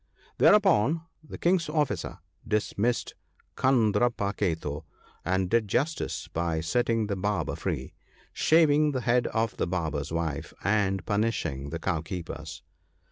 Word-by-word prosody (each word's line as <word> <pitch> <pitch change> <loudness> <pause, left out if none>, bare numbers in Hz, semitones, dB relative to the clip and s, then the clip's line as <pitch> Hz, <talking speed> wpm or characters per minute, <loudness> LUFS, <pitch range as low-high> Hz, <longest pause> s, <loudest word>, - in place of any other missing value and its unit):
" - - -30
Thereupon 170 - +5 0.2
the 155 - -9
King's 170 -2 +1
officer 150 -2 -1 0.3
dismissed 110 +2 0 0.4
Kandarpa 115 -4 +2
ketu, 80 -5 -2 0.4
and 95 +1 0
did 115 +2 +2
justice 150 +10 -1
by 85 -1 -1
setting 115 +7 +1
the 100 -1 -2
Barber 95 -4 -1
free, - - -4 0.4
shaving 155 -2 +4
the 130 - -1
head 125 +1 +2
of 115 -1 -1
the - - 0
Barber's 80 -5 -2
wife( 80 -3 -3
63 100 - 0
), - - +4
and 95 -3 0
punishing 105 -11 -1
the 80 - -3
Cow 80 0 -1
keeper's. 85 +1 -7
105 Hz, 135 wpm, -27 LUFS, 85-125 Hz, 0.4 s, Thereupon